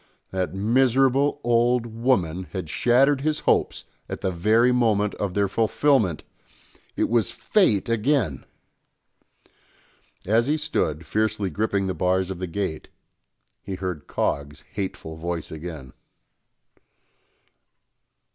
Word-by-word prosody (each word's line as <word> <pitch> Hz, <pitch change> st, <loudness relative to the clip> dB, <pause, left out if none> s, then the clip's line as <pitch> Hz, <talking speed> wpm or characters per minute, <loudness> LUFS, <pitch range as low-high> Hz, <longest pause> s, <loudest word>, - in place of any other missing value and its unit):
That 95 Hz, 0 st, -2 dB
miserable 130 Hz, +6 st, +2 dB
old 120 Hz, 0 st, +2 dB
woman 110 Hz, -7 st, 0 dB
had 95 Hz, -5 st, -4 dB
shattered 135 Hz, +3 st, +3 dB
his 155 Hz, +1 st, 0 dB
hopes -, -, +1 dB, 0.2 s
at -, -, -5 dB
the 95 Hz, -, 0 dB
very 110 Hz, +8 st, +3 dB
moment 110 Hz, -4 st, +2 dB
of 100 Hz, -3 st, -2 dB
their 100 Hz, -1 st, +2 dB
fulfilment. 110 Hz, -, +1 dB, 0.7 s
It -, -, +1 dB
was 115 Hz, -2 st, +1 dB
fate 115 Hz, -, +1 dB
again! 115 Hz, -, 0 dB, 1.8 s
As 115 Hz, +5 st, +2 dB
he 150 Hz, +2 st, +2 dB
stood, 80 Hz, -, -1 dB
fiercely 110 Hz, -3 st, -1 dB
gripping 100 Hz, +1 st, 0 dB
the 95 Hz, -, -1 dB
bars 95 Hz, +1 st, 0 dB
of 90 Hz, -, -6 dB
the 95 Hz, -, -3 dB
gate, 85 Hz, -3 st, -4 dB, 0.7 s
he 95 Hz, -, -5 dB
heard 90 Hz, -5 st, -5 dB
Coggs' 70 Hz, 0 st, -2 dB
hateful 95 Hz, -5 st, -5 dB
voice 85 Hz, 0 st, -4 dB
again. 80 Hz, -5 st, -8 dB
105 Hz, 115 wpm, -24 LUFS, 90-120 Hz, 1.8 s, shattered